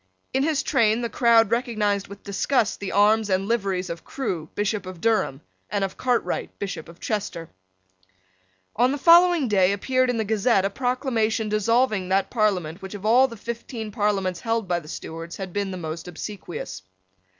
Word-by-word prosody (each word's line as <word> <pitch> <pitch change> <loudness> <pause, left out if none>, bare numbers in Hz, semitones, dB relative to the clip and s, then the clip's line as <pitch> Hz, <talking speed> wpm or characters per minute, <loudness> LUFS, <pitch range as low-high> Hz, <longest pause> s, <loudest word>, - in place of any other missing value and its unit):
In 265 - +2
his 300 0 +1
train 230 -4 +2
the 235 -2 -3
crowd 230 -3 +4
recognised 215 -5 0
with 200 0 -12
disgust 210 +3 0
the 200 - -4
arms 210 +1 +3
and 190 +1 +1
liveries 195 -5 0
of 170 -1 -6
Crewe, 175 - -4
Bishop 205 -1 -1
of 185 -2 -8
Durham, 215 -10 +1 0.3
and 205 -1 -1
of 195 - -3
Cartwright, 250 -2 -1
Bishop 195 -5 -5
of 170 - -14
Chester. 200 -6 -4 1.2
On 245 +4 +3
the 285 - -1
following 340 -1 +6
day 195 -3 +3
appeared 255 +5 +1
in 245 - 0
the 220 - 0
Gazette 210 -1 +2
a 200 - 0
proclamation 235 -3 0
dissolving 215 -2 +1
that 195 +1 +1
Parliament 190 -7 0
which 190 +1 -7
of 205 0 -8
all 250 +4 +5
the 230 -3 -10
fifteen 230 0 -6
Parliaments 195 -3 0
held 225 -3 -1
by 175 -1 +1
the 155 - -14
Stuarts 165 +2 -7
had 190 -3 -6
been 200 -1 -1
the 185 - -5
most 165 0 -6
obsequious. 175 - -7
210 Hz, 175 wpm, -24 LUFS, 190-235 Hz, 1.2 s, following